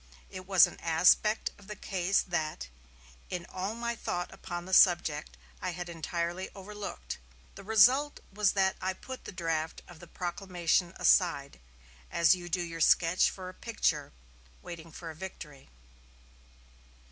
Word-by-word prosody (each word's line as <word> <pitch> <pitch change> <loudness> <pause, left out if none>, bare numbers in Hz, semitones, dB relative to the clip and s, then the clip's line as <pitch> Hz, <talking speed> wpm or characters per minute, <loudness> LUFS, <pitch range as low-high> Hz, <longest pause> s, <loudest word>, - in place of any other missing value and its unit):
It 185 0 -8
was 190 -3 +7
an - - -9
aspect 180 +6 +3
of 200 - -16
the 210 - -6
case 190 -1 0
that, 155 - -3 0.6
in 175 -1 -4
all 190 +4 -4
my 235 0 -2
thought 175 -5 -4
upon 175 -1 -6
the 190 - -7
subject, 160 - +4 0.2
I 180 - -2
had 175 0 -6
entirely 170 +2 -3
overlooked. 195 - -7 0.3
The 195 - -11
result 250 +8 +4
was 205 -1 +2
that 190 -1 +2
I 190 0 -1
put 260 +7 -9
the - - -6
draft 165 -3 -3
of 175 -2 -13
the 175 - -12
proclamation 175 -1 -1
aside, 155 - +2 0.5
as 170 +1 +5
you 175 -1 -5
do 175 +1 0
your 165 -1 -6
sketch 170 +3 +4
for 185 -1 -8
a 185 - -8
picture, 160 -10 -1 0.5
waiting 165 -1 -9
for 165 0 -8
a - - -12
victory." 150 - -9
175 Hz, 150 wpm, -30 LUFS, 165-195 Hz, 0.6 s, was